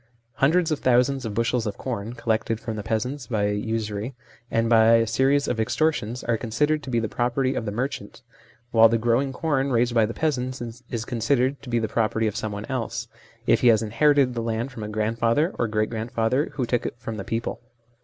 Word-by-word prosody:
Hundreds 165 +4 +3
of 155 - 0
thousands 125 +1 +2
of 105 - -5
bushels 115 0 0
of 100 - -4
corn, 115 -3 -4
collected 115 -2 -1
from 115 -1 -5
the 105 - -4
peasants 125 +6 -2
by 105 -3 0
usury 110 +2 -3 0.3
and 115 0 +1
by 115 0 +6
a 115 0 +3
series 135 +5 +2
of 115 - -1
extortions, 125 -1 0
are 115 -1 +1
considered 150 +7 0
to 135 - -8
be 120 -2 +1
the 110 - -1
property 125 +4 0
of 120 - -3
the 105 - -2
merchant, 125 0 -4 0.5
while 115 -1 +7
the 115 - +2
growing 120 +4 +1
corn 140 -1 0
raised 120 0 +2
by 115 -2 +4
the - - -4
peasants 130 -5 -1 0.3
is 115 -2 -3
considered 130 +3 0
to 130 - -10
be 120 - +1
the 115 -1 0
property 110 0 0
of 105 -1 -1
someone 105 -2 -4
else, 130 -4 -3 0.4
if - - +3
he 125 - +4
has 115 -1 +5
inherited 130 +4 +3
the 120 - -2
land 115 +3 -2
from 120 - -8
a 105 - -4
grandfather 115 - +1
or 120 - +2
great 110 0 -1
grandfather 115 +4 0
who 130 - -1
took 120 0 0
it - - -6
from 115 -2 -6
the 100 - -4
people. 115 +4 -3
115 Hz, 210 wpm, -24 LUFS, 110-130 Hz, 0.5 s, while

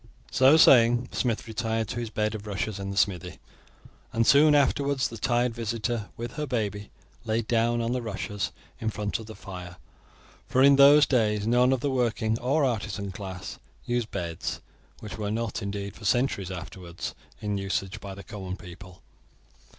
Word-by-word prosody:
So 135 +4 +6
saying, 120 -4 +6
the - - -10
smith 115 -3 -1
retired 115 0 -2
to 120 - -3
his 115 -2 -4
bed 110 -1 -1
of 105 -1 -7
rushes 100 0 -3
in 100 0 -4
the 100 - -5
smithy, 95 -4 0 0.7
and 115 0 +1
soon 150 +3 +6
afterwards 140 -1 +2
the 115 - -9
tired 120 +1 +1
visitor, 115 -1 -3
with 120 0 -5
her 150 0 -2
baby, 105 -5 -2 0.3
lay 115 0 0
down 115 +1 +1
on 115 +1 -1
the 125 0 -1
rushes 105 -3 -3 0.3
in 110 - -1
front 105 -1 -3
of 110 - -9
the 110 - -9
fire, 90 -3 -9 0.7
for 130 - +3
in 140 0 +7
those 145 +1 +8
days 105 -5 +1
none 125 +2 +4
of 130 -2 +1
the 140 - 0
working 115 -3 0
or 140 +4 +2
artisan 105 -5 -2
class 95 -2 -7 0.3
used 120 -2 -1
beds, 85 -4 -4 0.4
which 105 0 -8
were 105 -1 -2
not 115 0 -2
indeed, 100 -1 -4
for - - -14
centuries 105 -3 +1
afterwards, 90 -1 -7 0.3
in 105 -1 -2
usage 95 +1 -2
by 100 -1 -7
the 100 - -10
common 95 -2 -6
people. 90 +1 -12
110 Hz, 175 wpm, -27 LUFS, 100-120 Hz, 0.7 s, those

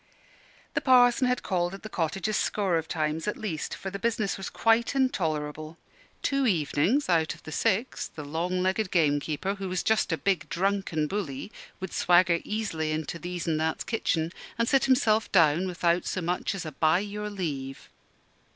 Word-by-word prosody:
The - - 0
Parson 250 -1 +5
had 250 0 0
called 175 -1 -1
at 195 - -13
the - - -5
cottage 180 0 -2
a 215 - -1
score 195 -4 +1
of 160 - -7
times 160 +1 -2
at 210 - -1
least: 170 -8 -4
for 190 - -6
the 200 - -5
business 215 -2 0
was 195 - -5
quite 230 +3 +2
intolerable. 155 - -1 0.5
Two 275 -2 +1
evenings 180 - +1
out 165 -3 +2
of - - -19
the 155 - -8
six, 225 +8 0
the 150 - -9
long 175 +5 -1
legged 190 +2 0
gamekeeper, 155 +2 +1
who 195 -2 -5
was 185 -1 -1
just 220 -4 +2
a 160 - +1
big, 170 -6 0
drunken 190 -4 0
bully, 165 -2 -4 0.3
would 190 - -6
swagger 175 -1 +4
easily 180 -8 -2
into 155 +2 -3
These 175 +1 -5
an' 160 -2 +1
That's 160 0 -1
kitchen 165 -7 -1 0.3
and 230 0 +1
sit 270 +1 +3
himself 230 -5 +3
down 170 0 +4
without 175 -1 0
so - - -1
much 180 +4 -1
as 185 - -5
"by 160 +1 +4
your 210 +1 -4
leave." 145 -9 -5
180 Hz, 180 wpm, -27 LUFS, 160-210 Hz, 0.5 s, Parson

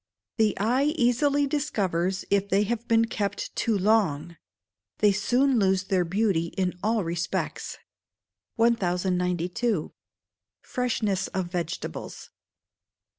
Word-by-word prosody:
The 220 -2 +2
eye 260 +9 +1
easily 280 +3 +2
discovers 195 - -1
if 200 0 +2
they 200 +1 +3
have 235 +2 -3
been 230 0 +4
kept 205 -3 -3
too 225 -3 +1
long; 180 -6 +1 0.6
they 210 -1 +4
soon 245 +6 +2
lose 190 -1 +2
their 190 -2 +1
beauty 190 -2 +1
in 185 -2 0
all 220 0 +1
respects. 170 +1 -3 0.8
1092. 180 -2 0 0.7
Freshness 215 -6 -1
of 185 -2 -4
Vegetables. 175 -1 -5
200 Hz, 105 wpm, -26 LUFS, 180-230 Hz, 0.8 s, been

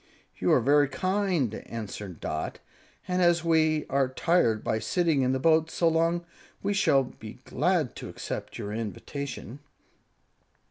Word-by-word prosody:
"You - - +2
are - - +5
very 145 +3 +4
kind," 185 - 0
answered 105 -6 -6
Dot, 80 0 -3 0.5
"and 180 0 0
as 175 -1 +4
we 160 -2 +3
are 135 -1 +2
tired 130 -5 +2
by 110 - 0
sitting 160 - +1
in 130 0 +2
the 130 - +1
boat 160 +2 +3
so 170 - +1
long, 165 +1 +1 0.4
we 200 +1 +1
shall 140 -8 +4
be 110 -3 -10
glad 175 - 0
to - - -7
accept - - -6
your 105 0 -5
invitation." 115 +5 -5
145 Hz, 145 wpm, -27 LUFS, 115-170 Hz, 0.5 s, are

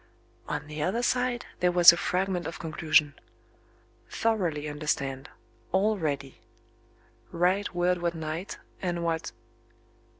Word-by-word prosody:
On - - -3
the 150 0 -6
other 205 +9 0
side, 250 -1 0
there 180 0 +3
was 175 -1 +9
a - - 0
fragment 180 0 -1
of 165 - -6
conclusion: 155 -2 +2 0.5
"... - - -34
thoroughly 175 -10 -1
understand. 145 -2 -3 0.4
All 205 +4 +2
ready. 140 -7 -4 0.9
Write 185 +3 +1
word 175 0 +1
what 170 0 -1
night, 160 +4 -5 0.2
and 175 -2 -2
what 165 -1 -2
170 Hz, 125 wpm, -28 LUFS, 155-185 Hz, 0.9 s, was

